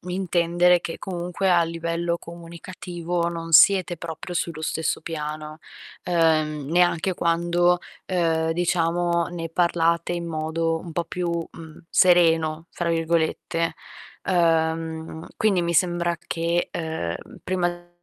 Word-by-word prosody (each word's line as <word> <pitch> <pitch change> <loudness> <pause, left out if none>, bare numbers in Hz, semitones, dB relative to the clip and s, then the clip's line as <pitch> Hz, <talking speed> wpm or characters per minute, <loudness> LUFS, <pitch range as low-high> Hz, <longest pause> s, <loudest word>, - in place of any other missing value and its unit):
intendere 180 -1 +2
che 165 - -6
comunque 180 +1 -2
a 175 -1 +5
livello 170 +1 -2
comunicativo 170 0 -5
non 165 -1 -6
siete 185 +1 +6
proprio 165 +2 -7
sullo 165 -2 -2
stesso 160 +1 -1
piano, 155 -1 -5 0.4
ehm, 155 -4 +1
neanche 175 +2 +2
quando, 175 +1 +2 0.3
ehm, 165 -3 +1
diciamo 170 0 +1
ne 170 -2 -5
parlate 170 0 +1
in 170 -1 -3
modo 165 +1 -1
un 170 -1 -9
po' 170 +1 -1
più, 175 +1 -3 0.2
mhmm, 160 0 -12
"sereno", 165 -3 +3
fra 175 - -3
virgolette. 165 0 0 0.5
Ehm, 160 -2 0
quindi 205 -4 +2
mi 170 0 -1
sembra 175 0 +1
che, 170 +1 -1
ehm, 160 - -3 0.3
prima 175 -1 -2
170 Hz, 115 wpm, -24 LUFS, 165-175 Hz, 0.5 s, siete